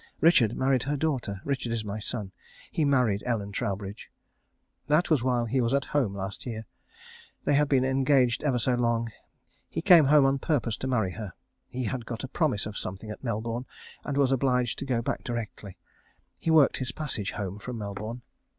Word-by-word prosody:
Richard 135 Hz, -10 st, +5 dB
married 130 Hz, -1 st, +2 dB
her 145 Hz, +4 st, -1 dB
daughter. 130 Hz, -11 st, -1 dB
Richard 135 Hz, -4 st, -1 dB
is 115 Hz, -2 st, -2 dB
my 105 Hz, +1 st, -4 dB
son. 105 Hz, -2 st, -4 dB, 0.4 s
He 155 Hz, -, +1 dB
married 125 Hz, -8 st, +2 dB
Ellen 105 Hz, -4 st, -2 dB
Troubridge. 100 Hz, -1 st, -4 dB, 0.8 s
That 150 Hz, +4 st, +2 dB
was 145 Hz, -6 st, +3 dB
while 125 Hz, -2 st, +1 dB
he 130 Hz, +3 st, +1 dB
was 120 Hz, +3 st, +2 dB
at 140 Hz, -, 0 dB
home 125 Hz, -9 st, +1 dB
last 95 Hz, 0 st, -5 dB
year. 110 Hz, -2 st, -5 dB, 0.8 s
They -, -, +2 dB
had 145 Hz, 0 st, +3 dB
been 130 Hz, -2 st, +3 dB
engaged 130 Hz, -2 st, +3 dB
ever 135 Hz, -5 st, +2 dB
so 125 Hz, +2 st, +1 dB
long. 115 Hz, -1 st, +1 dB, 0.6 s
He -, -, -4 dB
came 175 Hz, -5 st, +8 dB
home 145 Hz, 0 st, +6 dB
on 135 Hz, 0 st, +2 dB
purpose 130 Hz, -7 st, 0 dB
to 130 Hz, -, -4 dB
marry 110 Hz, -8 st, +1 dB
her. 105 Hz, -3 st, -7 dB, 0.4 s
He 130 Hz, 0 st, -4 dB
had 120 Hz, 0 st, -3 dB
got 115 Hz, 0 st, -5 dB
a -, -, -3 dB
promise 135 Hz, -6 st, 0 dB
of 105 Hz, -1 st, -5 dB
something 100 Hz, +3 st, -6 dB
at 105 Hz, -, -9 dB
Melbourne, 115 Hz, +1 st, -3 dB, 0.4 s
and 140 Hz, -1 st, -3 dB
was 135 Hz, -2 st, +3 dB
obliged 125 Hz, -2 st, +1 dB
to -, -, -4 dB
go 120 Hz, -3 st, 0 dB
back -, -, -2 dB
directly. 110 Hz, -5 st, -5 dB, 0.6 s
He -, -, -4 dB
worked 155 Hz, -3 st, +5 dB
his 130 Hz, -2 st, -3 dB
passage 130 Hz, -10 st, -3 dB
home 100 Hz, 0 st, -4 dB
from 125 Hz, +3 st, -6 dB
Melbourne. 105 Hz, +3 st, -5 dB
125 Hz, 190 wpm, -28 LUFS, 110-135 Hz, 0.8 s, came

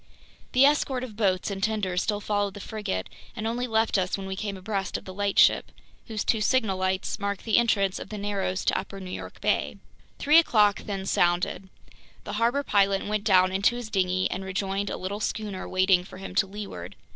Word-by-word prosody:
The 255 Hz, +2 st, +6 dB
escort 275 Hz, -3 st, +2 dB
of 230 Hz, -5 st, -7 dB
boats 195 Hz, -2 st, +1 dB
and 195 Hz, -1 st, -5 dB
tenders 190 Hz, -4 st, 0 dB
still 205 Hz, -1 st, -1 dB
followed 205 Hz, -1 st, -1 dB
the -, -, -7 dB
frigate 205 Hz, -, -4 dB, 0.3 s
and 220 Hz, -2 st, -4 dB
only 240 Hz, +2 st, -1 dB
left 220 Hz, -3 st, +2 dB
us 185 Hz, +1 st, -1 dB
when 195 Hz, -, -6 dB
we 190 Hz, 0 st, -4 dB
came 200 Hz, -1 st, -4 dB
abreast 195 Hz, 0 st, -3 dB
of -, -, -12 dB
the 185 Hz, -, -8 dB
lightship, 200 Hz, 0 st, +3 dB, 0.4 s
whose 220 Hz, -2 st, -3 dB
two 220 Hz, -, +1 dB
signal 215 Hz, -4 st, +2 dB
lights 185 Hz, +2 st, -1 dB
mark 200 Hz, -1 st, -3 dB
the 225 Hz, 0 st, +3 dB
entrance 200 Hz, -5 st, +1 dB
of -, -, -8 dB
the 210 Hz, -, -6 dB
narrows 200 Hz, -2 st, -2 dB
to -, -, +2 dB
Upper 195 Hz, -, -8 dB
New 185 Hz, -1 st, -7 dB
York -, -, -7 dB
Bay. -, -, 0 dB, 0.4 s
Three 300 Hz, +3 st, +6 dB
o'clock 210 Hz, -10 st, +3 dB
then 195 Hz, -2 st, -3 dB
sounded. 180 Hz, +1 st, +1 dB, 0.5 s
The -, -, -6 dB
harbor 245 Hz, +5 st, +2 dB
pilot 195 Hz, -4 st, +2 dB
went 210 Hz, 0 st, -2 dB
down 185 Hz, -3 st, +5 dB
into 200 Hz, +5 st, +2 dB
his 240 Hz, -3 st, -6 dB
dinghy 185 Hz, -1 st, +1 dB
and 190 Hz, -, -3 dB
rejoined 195 Hz, +1 st, -2 dB
a -, -, -3 dB
little 195 Hz, +3 st, -4 dB
schooner 210 Hz, -3 st, -3 dB
waiting 185 Hz, -1 st, +3 dB
for 185 Hz, -, -12 dB
him 195 Hz, -1 st, -8 dB
to 195 Hz, +1 st, +2 dB
leeward. 205 Hz, +1 st, -7 dB
200 Hz, 205 wpm, -26 LUFS, 190-215 Hz, 0.5 s, The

